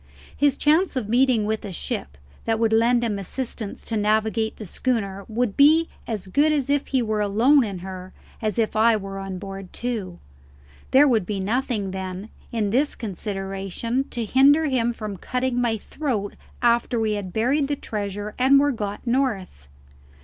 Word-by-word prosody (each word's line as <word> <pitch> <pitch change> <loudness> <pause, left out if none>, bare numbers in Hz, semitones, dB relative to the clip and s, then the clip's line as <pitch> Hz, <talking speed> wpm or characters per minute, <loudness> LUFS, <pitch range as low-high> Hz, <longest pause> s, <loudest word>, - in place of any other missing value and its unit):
His 285 -2 +2
chance 315 +3 +3
of 250 -5 -2
meeting 240 -1 +3
with 220 +1 -2
a 200 - -6
ship 70 - -5 0.3
that 225 -1 +1
would 225 0 +1
lend 235 +2 +3
him 210 -4 -1
assistance 225 +1 -5
to 225 - -3
navigate 220 +1 +1
the 215 - -7
schooner 200 -2 -2
would 225 -1 -1
be 315 +3 +5 0.2
as 215 -5 -4
good 290 +11 +2 0.2
if 285 -1 +1
he 260 -3 +1
were 215 -1 -1
alone 235 +8 +4
in 200 -4 -4
her 185 -1 -7 0.3
as 215 -3 -1
if 225 -2 0
I 220 +1 +4
were 195 -1 -6
on 195 -1 -5
board 195 0 -8
too. 220 -8 -4 0.7
There 280 +3 +6
would 220 -8 +2
be 205 -2 -2
nothing, 215 -1 -1
then, 190 +2 -5 0.2
in 215 -4 -1
this 280 +6 +1
consideration 195 +4 -3
to 235 -2 -3
hinder 280 +7 +5
him 245 -5 +1
from 215 -4 -6
cutting 250 +4 -1
my 230 -2 +1
throat 220 -4 -3 0.3
after 235 0 +2
we 220 -1 +1
had 205 -3 -3
buried 265 +8 +1
the 290 - -1
treasure 205 -3 -5
and 270 +2 +6
were 290 +1 +3
got 210 -3 -5
north. 235 - -1
220 Hz, 170 wpm, -23 LUFS, 200-255 Hz, 0.7 s, There